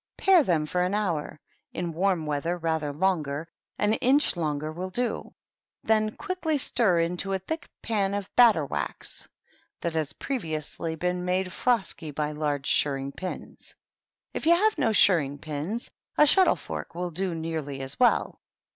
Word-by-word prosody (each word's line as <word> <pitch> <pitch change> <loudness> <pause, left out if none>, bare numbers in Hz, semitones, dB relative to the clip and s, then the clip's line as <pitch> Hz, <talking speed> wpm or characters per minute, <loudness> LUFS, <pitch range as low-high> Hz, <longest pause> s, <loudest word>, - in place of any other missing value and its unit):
Pare 380 -3 +6
them 165 - +1
for 180 +4 -1
an 185 +3 0
hour; 170 -8 -2 0.3
in 175 -2 -3
warm 180 -1 +1
weather 150 +4 -1
rather 160 -3 -1
longeTy 155 -3 0 0.2
— - - -51
an 210 +1 +2
inch 270 +3 +3
longer 155 -2 -2
toiU 185 +3 -5
do. 245 +5 -2 0.5
Then 215 -1 +2
quickly 355 -5 -1
stir 215 -10 +3
into 180 +3 -1
a - - +2
thick 320 - -5
pan 200 -3 0
of 200 -1 -3
batter 220 -11 +6
wax - - -3 0.5
that 170 - -2
has 155 -2 -1
previously 160 - -4
been 180 +2 -1
made 185 +1 0
frosky 210 -10 0
by 150 +1 -2
large 145 -2 -2
shirring 135 -1 +1
pins. 185 +5 -8 0.6
If - - -3
you 340 - +7
have 430 +4 +3
no 285 - +3
shirring 160 -9 +4
pinSy 155 +10 -4 0.3
a 300 - +7
shuttle 375 +5 +5
fork - - -7
will 175 0 -3
do 180 +1 -2
nearly 160 -4 -4
as 135 0 -6
well. 250 - +3
180 Hz, 160 wpm, -27 LUFS, 155-215 Hz, 0.6 s, you